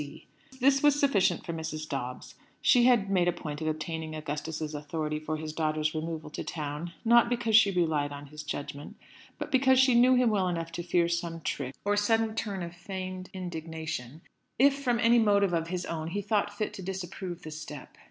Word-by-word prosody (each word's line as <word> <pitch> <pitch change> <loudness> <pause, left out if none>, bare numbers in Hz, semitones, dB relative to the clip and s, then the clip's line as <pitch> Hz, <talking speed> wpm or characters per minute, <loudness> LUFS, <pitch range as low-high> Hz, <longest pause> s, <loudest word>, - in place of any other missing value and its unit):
C." 145 - -9 0.3
This 270 +1 +4
was 290 -1 +4
sufficient 200 - +2
for 170 - -3
Mrs. 155 -1 -5
Dobbs. 125 -3 -5 0.3
She 245 -2 +5
had 230 -6 +4
made 180 -2 +3
a - - +4
point 155 -3 -6
of 155 - -2
obtaining 155 0 -3
Augustus's 155 +1 -4
authority 150 +1 -3
for 155 0 -3
his 155 0 -5
daughter's 155 -1 0
removal 160 -1 -4
to - - -5
town; 155 +2 -5
not 235 +1 +6
because 235 -2 +1
she 215 -2 +7
relied 160 -6 +1
on 145 0 -8
his 150 +2 -9
judgment, 145 -1 -6 0.4
but - - -6
because 260 0 +4
she 265 -1 +5
knew 250 +2 +6
him 250 -2 +4
well 195 -3 +1
enough 165 -2 -3
to 170 - -4
fear 175 0 +2
some 170 -1 -2
trick, 135 -3 -3
or 205 0 +2
sudden 225 +1 +2
turn 205 -4 -3
of 170 0 -6
feigned 185 0 -6
indignation, 160 - -5 0.4
if, 275 +3 +6
from 245 -3 +1
any 235 0 +5
motive 200 -4 +3
of 165 -1 0
his 180 +1 -3
own, 160 -1 -4
he 200 +5 -2
thought 205 0 +1
fit 210 +1 -3
to 205 - -7
disapprove 185 -1 -5
the 155 - -7
step. 150 -2 -9
170 Hz, 200 wpm, -29 LUFS, 155-205 Hz, 0.4 s, she